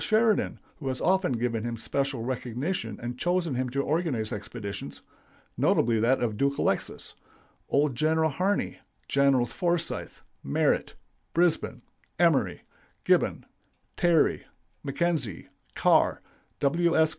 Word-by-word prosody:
Sheridan 220 -1 +2 0.2
(who 140 - -6
has 130 -1 -2
often 190 -6 +2
given 115 -2 -1
him 120 -1 -3
special 135 +1 -2
recognition 125 - -3
and 120 +1 -5
chosen 175 -3 0
him 130 0 -1
to 140 +3 -1
organize 145 -9 -1
expeditions, 105 0 -6 0.5
notably 115 -1 +2
that 120 +3 +2
of 120 - +1
the 105 - -8
Duke 140 +2 +1
Alexis), - - -1 0.6
old 145 0 +2
General 160 +3 +2
Harney, 190 +7 -1 0.3
Generals 135 -4 +3
Forsyth, 170 -1 -2 0.2
Merritt, - - +1 0.4
Brisbin, 170 -1 +1 0.3
Emory, - - +2 0.4
Gibbon, - - +2 0.5
Terry, 170 -3 +3 0.4
McKenzie, 140 - -1 0.3
Carr, - - +3 0.4
W. 165 +4 +2
S. 160 0 +5
140 Hz, 120 wpm, -27 LUFS, 120-170 Hz, 0.6 s, S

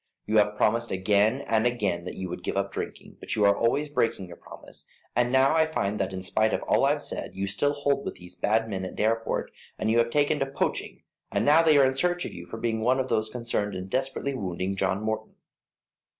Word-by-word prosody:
You 110 +1 +1
have 105 0 +3
promised 115 +3 +2
again 105 +6 +2
and 115 -2 +1
again 100 -8 -1
that - - -6
you 95 - -4
would 90 0 -6
give 90 - -3
up 100 0 -1
drinking, - - -7
but - - -3
you 105 - +3
are 100 0 +5
always 130 +8 +1
breaking 115 -9 0
your 85 - -9
promise, - - -11 0.3
and 120 0 +2
now 135 +3 +4
I 160 -1 +4
find 105 -9 -2
that 95 - -1
in 95 -1 -5
spite 110 +3 +1
of - - -1
all - - +3
I've - - +1
said, - - -5
you 95 +1 -2
still 145 +9 +1
hold 140 -1 0
with - - -5
those 90 0 -8
bad 110 +5 +1
men 95 -3 -4
at 95 - -6
Dareport, 115 +1 0 0.3
and - - -2
that - - +3
you 115 - +4
have 115 0 +2
taken 145 +3 +2
to 135 - 0
poaching, 135 - -3 0.3
and - - 0
now 150 +3 +6
they 155 -3 +5
are 140 - +6
in 130 - +2
search 175 +5 0
of - - -6
you 85 0 -9
for - - -7
being 110 -1 -1
one 125 +4 +2
of 130 - -1
those 110 0 0
concerned 110 -4 -2
in 90 +1 -6
desperately 135 +3 -1
wounding 95 -4 -3
John 95 +2 0
Morton. 110 0 -3
110 Hz, 240 wpm, -27 LUFS, 100-130 Hz, 0.3 s, now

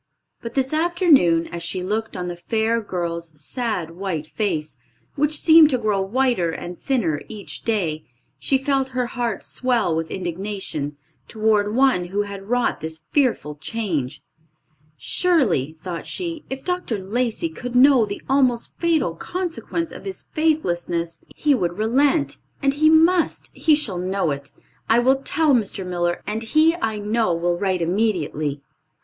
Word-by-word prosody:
But, 230 0 -7
this 265 +1 +1
afternoon, 310 - +4
as 170 -1 -5
she 170 +2 -3
looked 215 +2 -2
on 180 -1 -3
the 175 - -4
fair 225 +5 0
girl's 170 -5 -4
sad, 185 - -2
white 170 -3 -4
face, 155 - -2 0.4
which 300 +1 +1
seemed 320 -1 +7
to 260 - +1
grow 210 -4 0
whiter 235 -3 +1
and 175 +2 -6
thinner 190 - 0
each 210 -2 -7
day, 175 -9 -1 0.3
she 270 - +2
felt 270 0 0
her 250 - +2
heart 240 -4 -3
swell 240 -10 +1
with 160 0 -2
indignation 175 -5 -4 0.3
toward 215 -1 +1
one 255 -9 +3
who 200 +4 -1
had 200 0 -8
wrought 245 0 +1
this 160 0 -3
fearful 250 - +1
change. 155 - -3 0.7
"Surely," 245 - +1
thought 175 -2 -6
she, 335 -4 -4
"if 265 0 -5
Dr. 360 - -2
Lacey 235 - -1
could 250 -6 -7
know 260 -1 +6
the 200 -1 -5
almost 260 -4 +1
fatal 325 - +1
consequence 335 - -4
of - - -10
his 385 -1 -6
faithlessness 175 - -1
he 295 -1 +2
would 175 -8 -1
relent; 275 +8 +2 0.3
and 275 0 +3
he 310 +2 +4
must, 330 +2 +3
he 315 -2 +4
shall 215 - -2
know 185 -2 0
it. 140 0 -6 0.4
I 225 - +5
will 260 +3 +3
tell 310 0 +2
Mr. 205 -5 0
Miller 175 -1 -1
and 215 +2 -3
he 310 +8 +4
I 220 -10 -1
know 210 -3 0
will 175 +1 0
write 185 -3 0
immediately." 165 -7 -1
215 Hz, 155 wpm, -22 LUFS, 175-270 Hz, 0.7 s, seemed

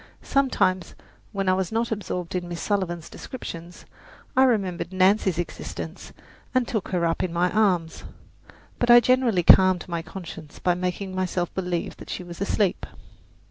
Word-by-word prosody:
Sometimes, 190 -10 +1 0.4
when 195 -2 -2
I 185 - +5
was 190 0 -1
not 230 +1 -1
absorbed 180 -5 -3
in 180 -1 -2
Miss 175 -1 -5
Sullivan's 175 -5 -2
descriptions, 175 -8 -8 0.5
I 265 - +6
remembered 190 -8 0
Nancy's 190 -1 +3
existence 175 - -6 0.4
and 255 -2 +2
took 220 -5 -2
her 175 -2 0
up 165 0 0
in 180 - -1
my 175 +2 +1
arms, 180 -7 +1 0.8
but 240 - 0
I 240 0 +10
generally 240 -6 +2
calmed 185 0 +6
my 170 -2 -3
conscience 165 -4 -9
by 180 - +1
making 180 +2 -3
myself 185 -2 -2
believe 180 -2 -3
that - - -12
she - - -4
was 175 +1 -10
asleep. 200 -1 0
185 Hz, 155 wpm, -25 LUFS, 175-205 Hz, 0.8 s, I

